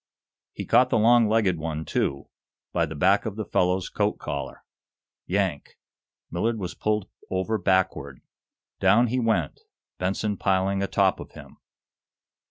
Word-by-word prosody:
He - - -6
caught 125 +2 +4
the - - +2
long 115 0 +5
legged 105 -6 +2
one, 80 0 -4
too, 70 0 -1 0.5
by 85 -2 +1
the 80 - -7
back 95 +8 +2
of 105 - -5
the 110 -1 -4
fellow's 90 0 +1
coat 105 0 -1
collar. 70 -1 -6 0.6
Yank! 95 -6 -2 0.5
Millard 110 +7 -1
was 90 -4 -5
pulled 105 -2 -1 0.2
over 95 +4 -1
backward. 90 -8 0 0.6
Down 100 +5 +4
he 130 +3 0
went, 110 - 0 0.4
Benson 100 +3 -1
piling 95 0 +1
a 100 - 0
top - - +2
of - - -10
him. - - -13
95 Hz, 145 wpm, -25 LUFS, 90-110 Hz, 0.6 s, long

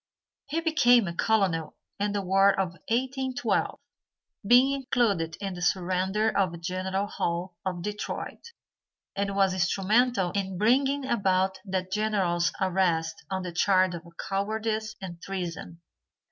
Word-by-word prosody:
He 315 +4 -1
became 245 - +4
a 170 - -3
colonel 185 -5 +1 0.2
in 205 +1 0
the 200 -1 -1
war 195 +1 +4
of 190 -2 +1 0.2
1812, 260 +3 -1 0.7
being 250 +4 +6
included 235 - 0
in 195 -2 -4
the 175 - -8
surrender 190 +4 +1
of 180 -4 0
General 185 +3 -2
Hull, 175 -2 -3
of 180 -2 -3
Detroit, 210 - -5 0.7
and 200 0 -1
was 195 -1 +3
instrumental 195 +2 +2
in 190 -2 -3
bringing 270 +6 +2
about 190 -5 +1
that 185 -1 -3
General's 190 -5 +1
arrest 175 -4 0
on 190 -1 -2
the 180 - -5
charge 185 +1 +3
of 170 - -5 0.2
cowardice 215 +2 -2
and 175 -3 -8
treason. 170 -3 -6
195 Hz, 130 wpm, -27 LUFS, 185-220 Hz, 0.7 s, being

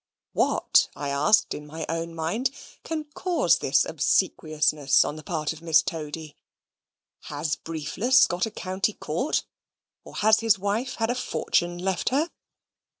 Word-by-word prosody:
What, - - +3
I 145 - -4
asked 145 +10 +3
in 150 0 -8
my 160 +1 -6
own 165 0 -3
mind, 185 +11 -1 0.3
can 320 -1 -3
cause 360 0 +2
this - - +2
obsequiousness 150 -3 +2
on 145 - -3
the 155 - -8
part 155 -2 -2
of 160 - -13
Miss 165 -1 +4
Toady; 155 -2 -6 0.9
has 150 +1 -2
Briefless 180 - +2
got 180 +4 -1
a - - -4
county 195 0 -2
court, 185 - -1 0.6
or - - -13
has 220 +1 +4
his 225 -2 +3
wife 205 +6 -2
had 225 +1 0
a - - +1
fortune 175 -8 -1
left 185 0 -1
her? 300 +6 0
170 Hz, 150 wpm, -25 LUFS, 155-220 Hz, 0.9 s, Miss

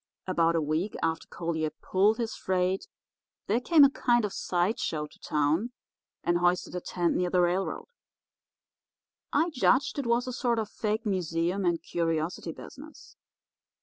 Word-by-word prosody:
"About 170 -2 +2
a 165 - +2
week 160 +7 -1
after 160 0 -1
Collier 160 -2 -2
pulled 200 +7 +1
his 230 -2 -3
freight 185 0 -1 0.6
there 220 +4 +1
came 315 +1 +6
a 280 - +8
kind 240 -4 +2
of 205 - -4
side 180 +5 0
show 150 -1 -2
to - - -17
town, 155 +11 0 0.5
and 175 0 +2
hoisted 175 0 +1
a 180 - -3
tent 175 -1 -1
near 180 0 +1
the 180 0 +3
railroad. 180 +2 0 1.5
I 325 +4 +2
judged 270 0 +2
it 270 - -2
was 235 +1 +2
a 255 - -4
sort 240 -2 0
of 220 -2 -2
fake 220 +1 -2
museum 180 -1 -1
and 170 -1 +1
curiosity 165 0 -2
business. 300 - -12
185 Hz, 155 wpm, -28 LUFS, 170-230 Hz, 1.5 s, a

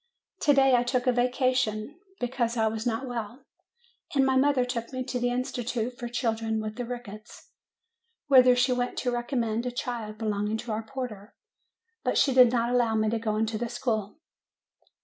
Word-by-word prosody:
TO 290 -2 +4
DAY 270 -1 +5
I 245 - +5
took 245 +1 0
a 255 - +4
vacation, 250 +1 0 0.2
because 240 -1 -1
I 220 - +2
was 220 +2 -2
not 230 +3 -1
well, 240 +2 -6 0.7
and 270 -1 +4
my 265 0 +2
mother 265 -1 +3
took 235 -2 -4
me 255 -1 -3
to 250 -1 -3
the 245 0 +1
Institution 245 -2 -2
for 240 - -6
Children 225 -2 -1
with 215 0 -5
the 245 - -3
Rickets, 220 -3 -9 0.7
whither 255 -3 +6
she 245 +1 +2
went 245 0 -2
to 250 - 0
recommend 240 -1 -1
a - - -2
child 235 -3 -4
belonging 210 -1 -1
to 230 +1 -6
our 215 +1 -1
porter; 220 -4 -7 0.7
but - - 0
she 270 - +4
did 250 -2 +7
not 240 -1 +1
allow 235 -3 +2
me 215 0 +1
to 230 - 0
go 215 -1 -1
into 220 0 -1
the 240 0 -2
school. 220 -2 -2
240 Hz, 185 wpm, -27 LUFS, 220-255 Hz, 0.7 s, did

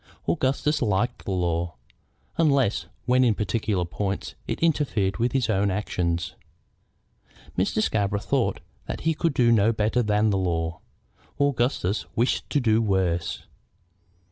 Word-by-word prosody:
Augustus 135 - +1
liked 120 +2 0
the - - -3
law, 85 -3 -1 0.6
unless 140 -9 +2 0.2
when 125 +1 +4
in 115 -4 +3
particular 105 -2 -1
points 95 +3 -3
it - - -2
interfered 140 - +1
with 120 +1 +1
his 135 -3 +1
own 100 -2 +2
actions. 85 -4 -1 1.2
Mr. 100 +3 +1
Scarborough 100 -1 +1
thought - - 0 0.3
that - - -4
he 160 0 +2
could 160 -2 -1
do 115 -3 +4
better 110 +3 +1
than 105 -1 +2
the 95 - +1
law. 80 -3 -1 0.6
Augustus 120 -7 +1
wished 120 +3 0
to 145 - +2
do 115 -3 +3
worse. 95 -5 0
105 Hz, 130 wpm, -25 LUFS, 95-125 Hz, 1.2 s, when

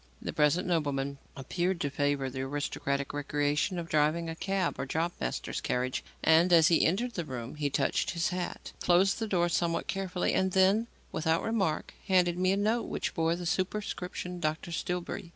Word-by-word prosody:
The - - -5
present 155 +5 +2
nobleman 140 -5 -1 0.2
appeared 175 +7 -1
to 145 - -1
favour 145 -1 0
the 130 0 -4
aristocratic 140 0 -2
recreation 145 +4 0
of 170 -1 -4
driving 155 +2 +1
a - - -6
cab 195 0 -1
or - - -2
job 165 +5 0
master's - - -3
carriage, 125 +1 -1 0.2
and, 165 +3 +5
as 165 -2 +7
he 170 - +4
entered 235 +9 0
the 175 - -2
room, 125 -4 -6
he 150 -1 -1
touched 140 0 0
his 170 -1 0
hat, 180 0 -4
closed 185 +4 +3
the 225 - -2
door 175 -4 +2
somewhat 170 0 0
carefully, 190 -2 -1
and 190 -1 +1
then, 195 +4 +4 0.2
without 160 +1 +1
remark, 195 -9 -1
handed 180 -3 +3
me 185 0 +3
a 195 - +2
note 220 +3 +1
which - - -3
bore 165 0 +1
the 175 0 -6
superscription 180 -1 -3
"Dr. 155 +1 -2
Stillbury." 175 +1 -3
170 Hz, 180 wpm, -30 LUFS, 145-185 Hz, 0.2 s, as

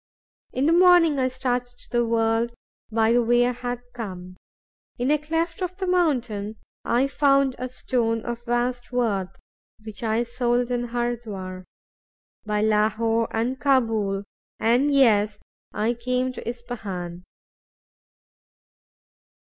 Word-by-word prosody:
In 260 - 0
the 325 - +4
morning 345 -4 +6
I 255 - +2
started 250 -1 -2
to - - -9
the 240 0 +2
world 230 0 +1 0.4
by 225 0 +3
the 240 +1 +4
way 240 +1 +3
I 250 - +1
had 245 0 -4
come. 185 -6 -7 0.6
In 250 +3 +1
a 300 - +3
cleft 325 +3 -2
of 365 0 -3
the 385 - -2
mountain 245 - 0 0.3
I 245 +3 +2
found 275 -1 +3
a 255 0 -3
stone 230 -3 -1
of 240 0 -4
vast 245 +1 -1
worth, 205 -7 -1 0.5
which 215 -2 -7
I 225 0 +1
sold 240 0 0
in 245 0 -1
Hurdwar. 220 -6 -4 0.8
By 210 0 0
Lahore, 220 +1 +2
and 245 +4 -1
Cabool, 225 -8 +1 0.4
and 245 +6 +3
Yezd, 210 -6 +4 0.3
I 220 +3 0
came 250 +2 -1
to - - -8
Ispahan. 200 -8 -6
240 Hz, 130 wpm, -24 LUFS, 220-255 Hz, 0.8 s, morning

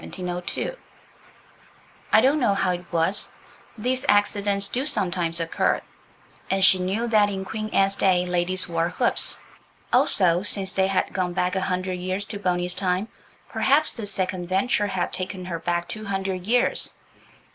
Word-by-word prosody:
I - - +6
don't 280 +4 +3
know 220 -7 +2
how 190 -2 +1
it 180 0 -6
was. 170 +4 +1 0.5
These 255 +4 0
accidents 205 -1 +2
do 250 +6 -2
sometimes 175 - +1
occur. 165 -1 0 0.7
And 190 0 +4
she 190 - +6
knew 195 +6 -1
that 210 -2 +4
in 190 -1 -4
Queen 215 +1 -4
Anne's 195 -2 +2
day 180 -2 +2
ladies 180 +1 +1
wore 165 0 0
hoops. - - 0 0.6
Also, 175 -3 +3
since 195 -1 -1
they 190 0 +2
had 195 -1 -1
gone 180 -2 -1
back 180 +1 0
a 190 - 0
hundred 185 -1 -2
years 185 +3 -3
to 205 0 -7
Boney's 180 -2 0
time, 185 +3 -1 0.4
perhaps 295 +3 +2
this 215 -4 -5
second 185 -2 -2
venture 200 +3 +1
had 190 -3 -2
taken 185 0 -4
her 170 -2 -4
back 175 0 -2
two 215 +4 -7
hundred 195 -2 -3
years. 245 +2 +1
190 Hz, 155 wpm, -24 LUFS, 180-205 Hz, 0.7 s, I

